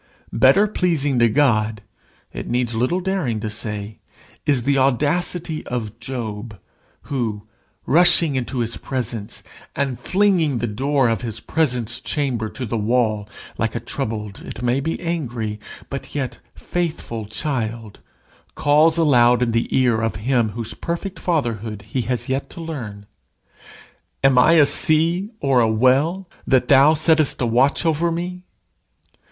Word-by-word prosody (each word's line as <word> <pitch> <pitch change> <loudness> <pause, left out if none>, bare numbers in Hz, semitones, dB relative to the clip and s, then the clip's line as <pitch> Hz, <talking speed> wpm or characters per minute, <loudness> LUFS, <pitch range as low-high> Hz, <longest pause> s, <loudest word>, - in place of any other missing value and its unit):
Better 135 - +5
pleasing 155 - +1
to 120 -1 +5
God, 110 -5 +1 0.5
it - - -6
needs 120 -1 -1
little 130 +11 0
daring 180 - -1
to 110 -1 -3
say, 105 0 -6 0.5
is 135 -5 +2
the 140 +2 +2
audacity 155 +5 0
of 115 -3 -4
Job, 115 -4 -6 0.4
who, 115 -7 -3 0.4
rushing 170 -2 +4
into 130 0 -2
his 115 0 -1
presence, 115 -5 -4 0.3
and 135 -3 -2
flinging 180 -4 +2
the 120 - -1
door 135 +4 +1
of 115 0 0
his 115 -4 -4
presence 125 -8 0
chamber 125 -7 -2
to 130 - -6
the 115 0 -2
wall, 110 -2 0 0.3
like 115 0 -1
a - - -1
troubled, 110 -4 -5
it 120 - -8
may 125 +2 +1
be 160 +4 -3
angry, 120 -11 -3 0.3
but 140 +1 -7
yet 135 -3 -3 0.2
faithful 155 -11 -4
child, 115 -3 -4 0.6
calls 155 +3 +4
aloud 125 -6 +4
in 120 - 0
the 115 0 0
ear 120 -4 +2
of 115 0 -1
him 120 +1 +1
whose 115 -1 -5
perfect 170 - -5
Fatherhood 115 - -2
he 110 +5 -3
has 125 +2 -3
yet 135 +1 -2
to - - -10
learn: 120 -12 -6 1.2
"Am 135 -2 +5
I 155 +6 +6
a 155 -3 +7
sea 165 +7 +2
or 135 -3 +2
a 115 -2 +3
whale, 140 - +2 0.2
that 130 -2 +2
thou 140 +3 +6
settest 155 -1 +2
a 125 - +1
watch 125 +8 +2
over 165 +1 +1
me?" 180 +2 -4
130 Hz, 145 wpm, -21 LUFS, 115-155 Hz, 1.2 s, a